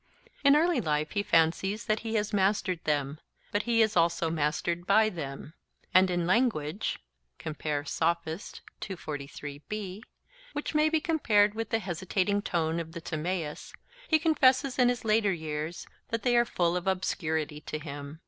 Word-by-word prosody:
In 280 0 +7
early 335 +3 +3
life 150 -1 -1
he 205 - 0
fancies 190 +4 +2
that 215 0 +1
he 225 0 -4
has 210 0 0
mastered 190 -3 +1
them: 145 -1 0 0.3
but 205 - +1
he 230 -1 +5
is 215 0 0
also 165 -1 +2
mastered 165 +3 -1
by 215 +2 +5
them; 150 -4 -7 0.4
and 185 0 +6
in 175 -1 0
language 190 - +1 0.4
(Sophist) 160 +4 -2 1.9
which 295 - -3
may 305 0 +4
be 320 0 +1
compared 220 - +3
with 225 -1 -4
the 225 - +2
hesitating 190 +1 -1
tone 165 -4 -1
of 165 -1 -6
the 170 - -6
Timaeus, 160 -1 -4 0.3
he 315 - +5
confesses 270 -5 +3
in 245 -1 +6
his 245 -2 -2
later 215 -2 +3
years 155 0 -4 0.2
that 230 -1 -2
they 245 -1 +3
are 240 0 +5
full 175 -6 0
of 180 +1 -3
obscurity 160 -5 -1
to 155 - -5
him. 145 0 -8
185 Hz, 150 wpm, -29 LUFS, 160-220 Hz, 1.9 s, In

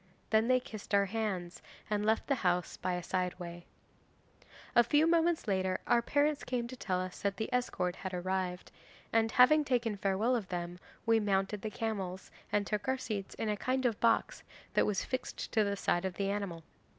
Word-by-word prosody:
Then 220 +1 +4
they 255 0 +4
kissed 215 -5 -4
our 200 0 +4
hands, 195 -4 -3 0.3
and 210 -1 0
left 220 +1 +2
the 280 - +2
house 180 -1 +1
by 180 - -2
a 180 0 -3
side 180 0 -1
way. 175 -1 -8 1.1
'A 240 - +8
few 300 +2 +4
moments 335 -3 +2
later 190 -2 +1
our 235 - +4
parents 290 +4 +1
came 245 -2 -2
to 255 - -7
tell 185 -7 -1
us 185 0 -5
that 200 -1 -1
the 220 - -3
escort 185 -8 0
had 190 - -5
arrived, 180 0 -2 0.4
and 225 0 +3
having 300 +6 +6
taken 245 -6 0
farewell 200 +5 +1
of 220 -6 -2
them 175 0 -4 0.3
we 225 -1 +4
mounted 195 0 0
the 215 - -3
camels, 195 -5 -4 0.2
and 205 0 +2
took 210 +4 -2
our 260 0 +2
seats 210 -6 -4
in 225 - -3
a 210 - +1
kind 255 +5 -1
of 230 -4 +1
box 230 - +2 0.3
that - - +3
was 205 -3 0
fixed 255 -1 -4
to 220 - +3
the 200 -1 0
side 175 -2 +1
of 190 -2 -3
the 200 0 0
animal. 195 -5 -3
205 Hz, 200 wpm, -32 LUFS, 185-235 Hz, 1.1 s, A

